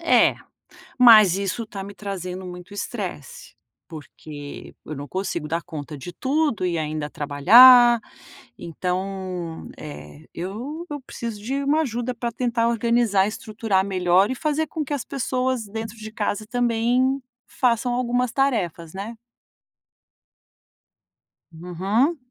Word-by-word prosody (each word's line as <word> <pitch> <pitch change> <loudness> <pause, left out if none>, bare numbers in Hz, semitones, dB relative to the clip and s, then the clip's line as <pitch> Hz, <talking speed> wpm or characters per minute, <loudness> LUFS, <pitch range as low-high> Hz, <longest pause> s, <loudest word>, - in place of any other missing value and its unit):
é, - - +4 0.6
mas 215 -7 +8
isso 200 +4 -2
está 205 -3 -7
me 200 +1 -9
trazendo 185 -2 -6
muito 180 +3 -10
estresse, 485 - -6 0.3
porque 150 -2 -10
eu 155 - -6
não 145 +1 -7
consigo 170 -2 -3
dar 170 +1 -2
conta 150 -1 -7
de 175 +6 -8
tudo 275 - 0
e 170 -1 -1
ainda 155 -1 -3
trabalhar, 235 - +7 0.6
então 180 0 -4
eh, 75 - -10
eu 245 - -6
eu 290 -2 -5
preciso 230 -4 -7
de 270 +4 -2
uma 300 +3 +2
ajuda 245 -2 -3
para 235 0 -3
tentar 235 -1 0
organizar, 230 -4 +2
estruturar 215 -3 -1
melhor 185 +2 +2
e - - -2
fazer 305 +2 -1
com 310 -1 -4
que 290 - -4
as 275 - -2
pessoas 255 -3 -1
dentro 225 +2 -6
de 220 0 -8
casa 210 0 -2
também 245 +3 +1 0.3
façam 245 -1 +1
algumas 245 -1 0
tarefas, 190 - -1
né. 210 +4 -6 2.3
Uhum. 190 - 0
215 Hz, 125 wpm, -23 LUFS, 180-245 Hz, 2.3 s, mas